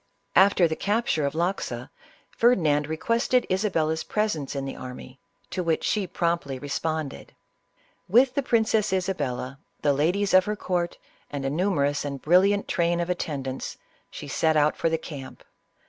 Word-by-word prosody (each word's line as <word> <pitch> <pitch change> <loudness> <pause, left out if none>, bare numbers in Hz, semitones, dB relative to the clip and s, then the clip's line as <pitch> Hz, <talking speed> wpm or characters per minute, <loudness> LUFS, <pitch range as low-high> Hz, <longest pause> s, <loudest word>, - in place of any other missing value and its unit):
After 190 -2 +6
the 160 - -2
capture 205 -8 0
of 140 - -5
Loxa, 175 +4 -2 0.4
Ferdinand 155 -11 +3
requested 230 +9 +1
Isa 190 +3 +1
bella's 160 -2 0
presence 210 -11 -2
in 135 -1 -2
the 135 - -5
army, 130 +1 -9 0.3
to 185 - -2
which 165 -2 0
she 205 -3 0
promptly 170 -6 -1
responded. 145 +1 -4 0.7
With 250 +6 +5
the 280 - +1
Princess 220 -5 +2
Isab 190 0 0
lla, 130 +1 -3 0.2
the 145 -1 +4
ladies 180 +8 +1
of 185 0 +6
her 210 - -1
court, 180 -4 -2 0.3
and 140 -2 -4
a 135 - 0
numerous 145 -4 +1
and 140 -1 -4
brilliant 190 +7 +3
train 170 0 +1
of 175 +1 -1
at 180 - -2
tendants, 135 -3 -4 0.3
she - - -8
set 160 -1 +1
out 150 0 +3
for 165 - 0
the 160 - +1
camp. 140 -4 -9
170 Hz, 160 wpm, -26 LUFS, 145-195 Hz, 0.7 s, After